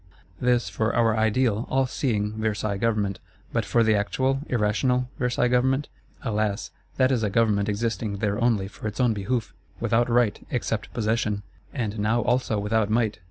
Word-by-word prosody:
This 125 -1 +2
for 110 +1 -1
our 115 -2 +3
ideal, 110 0 +1
all 135 0 +2
seeing 105 -5 -1
Versailles 110 -2 -1
Government. 105 -3 0 0.3
But - - 0
for 115 - +3
the 110 -1 +3
actual 130 +6 +1
irrational 125 +3 +1
Versailles 125 0 +1
Government? 130 +3 +1 0.3
Alas, 105 -2 -1 0.3
that 130 0 +4
is 125 -4 +1
a 105 - +1
Government 105 -1 +2
existing 110 -1 -2
there 105 +2 -1
only 110 -5 +2
for 105 +2 -7
its 105 +3 -6
own 125 -3 +3
behoof: 110 +3 -2 0.3
without 120 +1 +2
right, 120 -3 +2
except - - -2
possession; 110 -2 -1 0.3
and 110 -5 -3
now 110 +3 +2
also 125 -3 +1
without 105 +1 +1
might. 110 -2 +1
110 Hz, 160 wpm, -25 LUFS, 105-125 Hz, 0.3 s, that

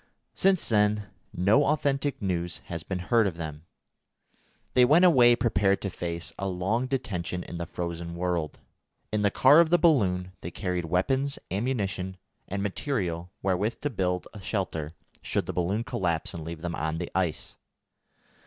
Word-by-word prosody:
Since 190 -2 +2
then 105 -1 +2 0.2
no 105 +11 +3
authentic 140 -1 0
news 90 -3 -2
has 85 -2 -5
been 95 +3 -4
heard 110 +4 +2
of 85 -4 -4
them. 80 0 -7 1.1
They 125 - +6
went 155 +8 +6
away 120 -8 +7
prepared 100 -5 +2
to 100 - -2
face 85 -1 -4
a 95 - -1
long 95 +7 0
detention 100 -10 -3
in 85 - -7
the 85 - -4
frozen 85 -1 -5
world. 85 -4 -2 0.5
In 105 - 0
the 100 - +4
car 135 - +6
of 170 -1 +5
the 175 - +5
balloon 95 - +2
they 85 - -5
carried 90 -1 -3
weapons, 130 - 0
ammunition, 100 -4 -2 0.3
and 100 +1 -3
material 90 - -2
wherewith 95 +4 0
to 145 0 -1
build 90 -5 -1
a 105 - -9
shelter, 90 -7 -2 0.3
should - - -1
the - - -4
balloon 90 +6 0
collapse 95 -5 -1
and 85 -3 -6
leave 80 0 -7
them 85 -1 -2
on 80 0 -2
the 90 0 -5
ice. 90 -5 -2
95 Hz, 165 wpm, -27 LUFS, 85-120 Hz, 1.1 s, away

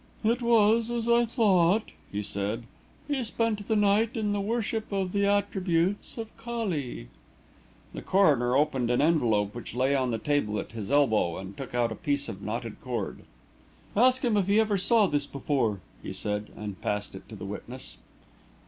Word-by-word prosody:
"It 230 +3 +2
was 230 -1 +4
as 235 -1 -2
I 235 0 +4
thought," 210 -3 +3 0.2
he 105 +1 -3
said. 100 +4 -3 0.4
"He 285 -3 -1
spent 220 -2 -1
the 220 - +1
night 210 +3 +2
in 210 -2 0
the 205 - 0
worship 220 +1 -2
of 190 -2 -1
the 200 0 +1
attributes 195 -2 0
of 225 -1 -7
Kali." 200 - -4 0.8
The - - -6
coroner 140 -11 +3
opened 135 -5 +1
an 125 - +2
envelope 115 -10 +2
which 120 -1 -8
lay 130 +2 +2
on 130 -2 +1
the 115 - -1
table 110 -4 0
at - - -6
his 110 -4 -6
elbow 110 -12 +2
and 95 +1 -8
took 130 0 -7
out 120 -1 +1
a - - -3
piece 145 -4 -1
of 95 - -7
knotted 110 +2 -5
cord. 125 -2 -4 0.7
"Ask 255 +4 +4
him 225 -3 +2
if 195 -2 +1
he 205 +2 +4
ever 215 -2 +2
saw 215 +3 +4
this 145 -5 -1
before," 130 -8 -1 0.2
he - - -6
said, 105 0 -3
and 105 -3 -6
passed 105 0 -2
it - - -11
to - - -8
the - - -7
witness. - - -8
170 Hz, 180 wpm, -28 LUFS, -, 0.8 s, was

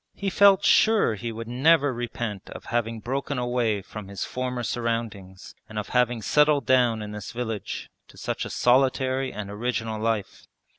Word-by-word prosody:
He 195 -1 -2
felt 200 0 +5
sure 220 - +4
he 115 +2 -5
would 115 0 -7
never 140 +3 +3
repent 120 -4 -5
of - - -10
having 115 -1 -1
broken 135 +3 -3
away 120 -5 0
from 105 0 -9
his 100 -2 -4
former 125 -1 -3
surroundings 110 -5 -4 0.2
and 110 - -8
of 105 - -3
having 120 -2 +1
settled 150 -1 +3
down 120 -4 +3
in 105 - -7
this 105 -1 -7
village 115 -4 -5 0.2
to - - -18
such - - -3
a - - -5
solitary 130 +1 +2
and 100 -1 -6
original 110 0 -3
life. 110 -3 -2
120 Hz, 165 wpm, -25 LUFS, 110-130 Hz, 0.2 s, felt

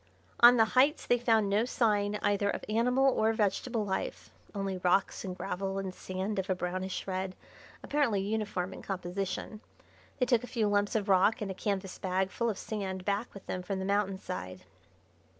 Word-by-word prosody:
On 245 +1 +9
the 225 - +6
heights 280 +5 +4
they 245 - +3
found 225 -3 +3
no 205 +3 +2
sign 210 -4 +1
either 205 0 +2
of - - -3
animal 250 +5 +3
or 220 +1 +2
vegetable 220 +2 0
life 190 -1 -3 0.2
only 195 -2 -2
rocks 180 +2 +1
and 185 -2 -5
gravel 195 +1 -3
and 195 -1 -3
sand 190 +3 -3
of 190 +1 -3
a 185 - +2
brownish 185 +1 -3
red, 185 -1 -3 0.5
apparently 280 -9 +1
uniform 200 -2 -2
in - - -9
composition. 195 +3 -4 0.6
They 250 - +2
took 240 -1 +2
a - - -6
few 230 -4 0
lumps 205 +1 +1
of 210 -2 0
rock 195 +5 +4
and 205 -3 -3
a - - -3
canvas 190 -1 -3
bag 190 0 0
full 235 0 0
of 210 - -3
sand 190 -4 -4
back 205 +4 -1
with 200 - -10
them 185 - -3
from 190 +2 -3
the 190 - -3
mountain 200 -1 +1
side. 180 - -6
200 Hz, 185 wpm, -31 LUFS, 190-220 Hz, 0.6 s, On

